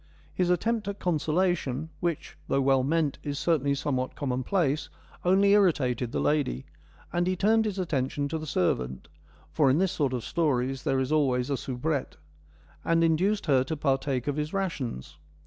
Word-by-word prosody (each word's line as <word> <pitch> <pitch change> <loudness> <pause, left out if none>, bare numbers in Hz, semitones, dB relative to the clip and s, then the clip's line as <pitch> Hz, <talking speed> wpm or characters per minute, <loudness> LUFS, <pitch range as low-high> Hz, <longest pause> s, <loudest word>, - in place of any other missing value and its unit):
His 180 -1 0
attempt 220 +4 0
at 200 0 -3
consolation 160 -3 0
— - - -29
which, 170 -3 -3
though 135 - +1
well 135 -1 +3
meant, 150 0 0
is 145 -1 -4
certainly 145 -4 +1
somewhat 130 -2 -2
commonplace 140 +3 -1 0.2
— - - -25
only 195 +2 +4
irritated 130 - +2
the - - -1
lady, 145 - 0 0.5
and 175 +1 +1
he 185 - +1
turned 220 +4 +3
his 205 -2 -2
attention 140 -5 -1
to 160 - -2
the 155 - -7
servant 65 - -1 0.4
(for 145 -4 +3
in 130 - +3
this 185 +1 +2
sort 140 -4 0
of 125 -3 -3
stories 135 -5 0
there 135 - +1
is 130 +2 -1
always 135 -3 +1
a - - +2
soubrette) 135 +3 -3 0.7
and 165 0 +2
induced 185 +6 +2
her 135 -5 +3
to 155 +4 -4
partake 135 -3 0
of 145 0 -2
his 150 +1 -3
rations. 150 - -3
150 Hz, 175 wpm, -27 LUFS, 130-175 Hz, 0.7 s, only